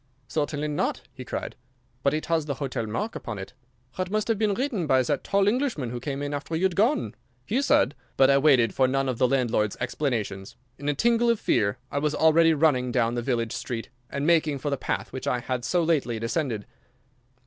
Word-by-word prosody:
"Certainly 150 +1 -2
not!" 145 - -1
he - - -8
cried. - - -5 0.5
"But 140 +2 +2
it 155 - -3
has 165 -2 0
the 140 - -2
hotel 130 -5 -3
mark 210 - -3
upon 115 -3 -5
it! 95 +4 -8 0.4
Ha, 185 - -5
it 185 - -2
must 215 +2 -1
have 220 -3 +1
been 210 -2 +2
written 235 - -1
by 130 -2 +4
that 140 +2 -1
tall 200 0 +2
Englishman 225 - 0
who 125 - -4
came 140 +2 -4
in 145 0 -3
after 145 +3 -3
you 165 - -1
had 185 -2 +1
gone. 240 - +2 0.3
He 245 - 0
said—" 145 - +3 0.2
But 135 0 +6
I 140 - +5
waited 130 -7 +4
for 130 - +3
none 135 +1 0
of 125 -3 -2
the 125 - +4
landlord's 120 -6 +1
explanations. 105 -9 -2 0.2
In 145 +1 -2
a 145 - +1
tingle 235 - +3
of 230 -2 +2
fear 100 +2 +1
I 140 - 0
was 150 +1 0
already 160 0 +5
running 135 -5 +2
down 120 -2 +1
the 120 - -1
village 115 -2 -1
street, 115 -2 -4 0.2
and 140 +1 -3
making 155 -3 +3
for 145 +2 -3
the - - +2
path 135 - -3
which 130 - -5
I - - +2
had 125 0 -3
so 175 +8 +1
lately 145 -8 +1
descended. 115 -2 -2
145 Hz, 220 wpm, -26 LUFS, 125-165 Hz, 0.5 s, But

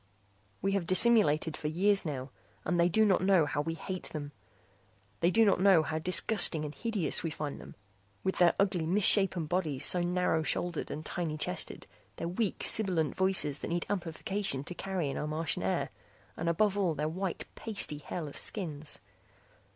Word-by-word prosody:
We 195 - +1
have 195 -4 -1
dissimulated 185 -6 +4
for 150 - -5
years 195 +5 +2
now, 135 -3 -5 0.3
and 175 - 0
they 170 +1 +4
do 220 +5 +3
not 195 -3 +2
know 185 -4 +3
how 145 0 -2
we 165 +2 -4
hate 185 +2 -6
them. 145 -2 -7 0.9
They 170 - +2
do 225 +4 +4
not 200 - +2
know 190 -5 +5
how 155 0 -3
disgusting 175 -2 +3
and 150 - -7
hideous 210 -9 +1
we 165 - -3
find 150 -2 -6
them, - - -13 0.5
with 190 - -2
their 175 -1 +4
ugly 190 -5 0
misshapen 190 -2 +4
bodies, 155 -5 -1
so 180 - +5
narrow 175 -2 0
shouldered 170 +1 -3
and 155 +1 -6
tiny 160 -3 -4
chested, - - -3 0.3
their 165 - -5
weak 190 +4 -2
sibilant 185 -9 +4
voices 190 -7 0
that - - -6
need 170 +1 -2
amplification 180 -4 -1
to 180 - -7
carry 185 -3 -3
in 135 - -4
our 150 - -3
Martian 155 - -1
air, 95 +1 -2 0.4
and 165 +1 -2
above 205 +4 +1
all 175 -5 0
their 150 +2 -2
white 185 +3 -4
pasty 200 -9 -4
hairless 150 -1 -6
skins. 155 - -4
175 Hz, 175 wpm, -30 LUFS, 155-195 Hz, 0.9 s, know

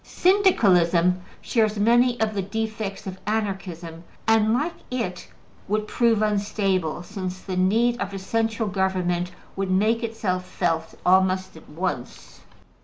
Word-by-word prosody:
Syndicalism 185 - +3 0.2
shares 220 -2 +1
many 240 +3 +3
of 220 -1 +1
the 200 - -1
defects 215 0 -4
of 190 -1 -6
Anarchism, 185 -6 -3 0.2
and, 220 -1 +4
like 295 +9 0 0.2
it, 225 -8 -3 0.4
would 210 +1 -1
prove 230 -2 +2
unstable, 195 -5 0
since 185 -1 -6
the 185 - -5
need 225 +7 +2
of 200 -1 -2
a 195 - -5
central 225 +3 -1
government 185 -2 0 0.3
would 195 -1 -2
make 215 +5 +2
itself 215 -6 -2
felt 165 -2 -1
almost 185 0 +3
at 160 - -14
once. 155 -5 -5
195 Hz, 130 wpm, -24 LUFS, 185-220 Hz, 0.4 s, and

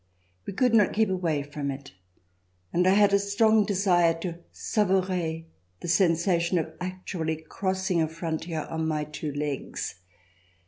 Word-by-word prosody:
We - - -3
could 245 +4 +2
not 210 -3 +5
keep 220 -1 +2
away 165 -6 0
from 145 0 -4
it. 135 0 -6 0.8
And 180 +1 +3
I 190 - +5
had 205 -1 +5
a 200 - +5
strong 210 +2 +3
desire 180 -4 +3
to 170 -2 -4
savourer 185 -5 0 0.4
the - - -5
sensation 170 0 +2
of 160 -1 -2
actually 180 -3 -3
crossing 190 -2 0
a 160 - +2
frontier 160 0 -3
on 160 0 -3
my 155 -1 0
two 150 0 -5
legs. 145 -9 -4
175 Hz, 145 wpm, -27 LUFS, 160-195 Hz, 0.8 s, not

